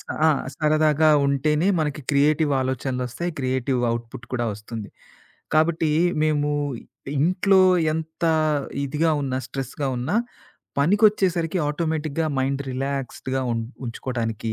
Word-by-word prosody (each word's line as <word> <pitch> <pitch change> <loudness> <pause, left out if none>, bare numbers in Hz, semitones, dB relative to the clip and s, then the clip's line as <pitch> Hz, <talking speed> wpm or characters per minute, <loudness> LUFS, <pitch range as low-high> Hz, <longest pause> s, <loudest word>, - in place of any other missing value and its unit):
అ - - -7
ఆ! - - +6 0.3
సరదాగా 155 0 +3 0.2
ఉంటేనే 150 +4 +1
మనకి 150 -1 -1
క్రియేటివ్ 150 +2 +3
ఆలోచనలొస్తయి. 130 +4 -2
క్రియేటివ్ 130 -1 0
ఔట్పుట్ 115 +1 -7
కూడా 120 -1 0
వస్తుంది. 105 +1 -7 0.7
కాబట్టి, 160 0 +2 0.3
మేము 150 -1 +1 0.7
ఇంట్లో 185 +5 +4 0.3
ఎంత 160 +1 -4 0.6
ఇదిగా 155 +4 +1
ఉన్నా, 130 -2 -1
స్ట్రెస్‌గా 135 +1 -4
ఉన్నా, 135 - -1 0.6
పనికొచ్చేసరికి 185 -1 +3
ఆటోమేటిక్‌గా 160 0 -1
మైండ్ 135 +1 0
రిలాక్స్డ్‌గా 135 0 -3
ఉం 115 - -1 0.3
ఉంచుకోవటానికి, 115 -2 -3
145 Hz, 105 wpm, -23 LUFS, 130-160 Hz, 0.7 s, ఆ